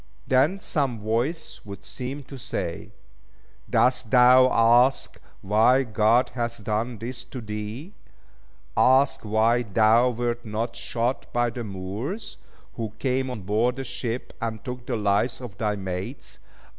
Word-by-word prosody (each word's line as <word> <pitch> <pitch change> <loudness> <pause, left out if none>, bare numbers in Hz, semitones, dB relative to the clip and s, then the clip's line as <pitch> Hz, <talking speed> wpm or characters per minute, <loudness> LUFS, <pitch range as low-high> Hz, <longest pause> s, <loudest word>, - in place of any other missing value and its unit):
Then 140 +9 +3
some 140 - -1
voice 120 +10 -2
would 100 -1 -10
seem 135 +5 -6
to 135 - -11
say, 85 -9 -4 0.8
"Dost 125 -2 +2
thou 125 +1 +7
ask 120 +3 +3 0.2
why 110 +7 +4
God 115 +1 +3
hath 115 -3 -4
done 110 +3 -2
this 125 +3 -6
to 125 +1 -8
thee? 110 - -6 0.8
Ask 130 +2 +4
why 110 +3 +2
thou 115 +3 +4
wert 120 0 -2
not 115 +1 -3
shot 115 +2 -2
by 120 0 +1
the 120 0 -5
Moors, 105 - -5 0.4
who 110 -3 -4
came 130 +2 0
on 115 -6 -6
board 110 +6 +1
the 135 - -4
ship, 120 -1 -4
and 115 -2 -4
took 125 -1 -6
the 125 - -1
lives 105 +5 +1
of 120 -6 -8
thy 105 -2 0
mates. 95 +6 -6
120 Hz, 140 wpm, -25 LUFS, 110-130 Hz, 0.8 s, thou